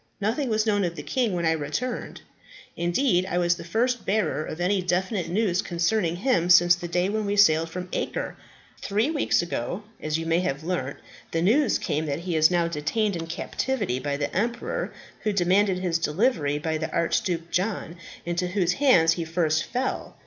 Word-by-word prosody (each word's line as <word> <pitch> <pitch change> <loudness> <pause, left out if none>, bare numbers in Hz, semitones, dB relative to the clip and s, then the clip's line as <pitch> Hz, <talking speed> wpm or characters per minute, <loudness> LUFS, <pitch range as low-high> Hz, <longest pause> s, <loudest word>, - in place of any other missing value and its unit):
Nothing 230 +6 -1
was 215 0 +1
known 205 -2 +2
of 170 -1 -2
the 150 - -7
king 240 - 0
when 170 -1 -1
I 160 - +3
returned. 160 - -3 0.5
Indeed, 180 +2 +1
I 175 - -1
was 175 -1 +3
the 170 - -8
first 235 +7 0
bearer 200 -7 0
of 155 - -7
any 185 +2 +1
definite 180 +2 -1
news 190 -1 +1
concerning 175 0 0
him 180 -4 +1
since 175 0 +7
the 175 0 -4
day 180 +2 +1
when 210 0 -1
he 205 - 0
sailed 165 -5 +4
from 180 +2 -6
Acre. - - -3 0.5
Three 215 +9 0
weeks 295 - +1
ago, 175 - -4 0.2
as 155 0 -1
you 165 - -4
may 165 +1 +2
have 145 -4 -2
learnt, 160 -6 -3 0.3
the 165 0 -1
news 245 +7 +3
came 155 +2 -2
that 145 +2 -2
he 175 -1 -3
is 155 0 +5
now 175 -2 +2
detained 175 +6 -1
in 165 -1 -5
captivity 190 - -2
by 140 +1 -2
the 145 - -3
emperor 235 +5 -2 0.3
who 215 - 0
demanded 190 0 +2
his 175 -2 0
delivery 160 - +1
by 155 +1 -2
the 160 - -3
Archduke 170 0 -1
John, 185 -3 -2 0.3
into 175 +1 -1
whose 180 -1 +1
hands 165 - +5
he 170 - -3
first 160 -1 0
fell. 255 +1 -3
175 Hz, 190 wpm, -25 LUFS, 165-210 Hz, 0.5 s, since